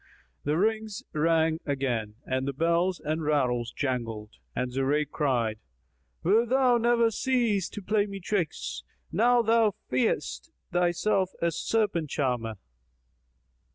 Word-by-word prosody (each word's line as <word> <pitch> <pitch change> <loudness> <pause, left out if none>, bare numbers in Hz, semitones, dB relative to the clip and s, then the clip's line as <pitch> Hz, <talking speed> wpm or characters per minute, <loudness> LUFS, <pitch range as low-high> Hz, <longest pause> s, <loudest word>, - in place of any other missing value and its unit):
The 150 +2 +1
rings 220 +3 0
again 160 +1 +2 0.3
rang 110 -4 -2
and 130 +1 -1
the 140 - -1
bells 170 +5 +1
and 155 +2 -2
rattles 125 -6 +1
jangled, 115 -6 -3 0.2
and 125 0 -1
Zurayk 140 +3 0
cried, 120 -7 0 0.6
"Wilt 220 +6 +3
thou 255 -2 +4
never 235 0 +3
cease 230 -5 +1
to 210 - -8
play 210 +1 +1
me 200 -1 -6
tricks? 170 - -2 0.3
Now 240 +2 +4
thou 225 -2 +3 0.2
feignest 95 - 0 0.2
thyself 180 +2 +1
a 170 0 +1
serpent 175 -3 0
charmer!" 120 -6 -1
165 Hz, 120 wpm, -28 LUFS, 130-215 Hz, 0.6 s, thou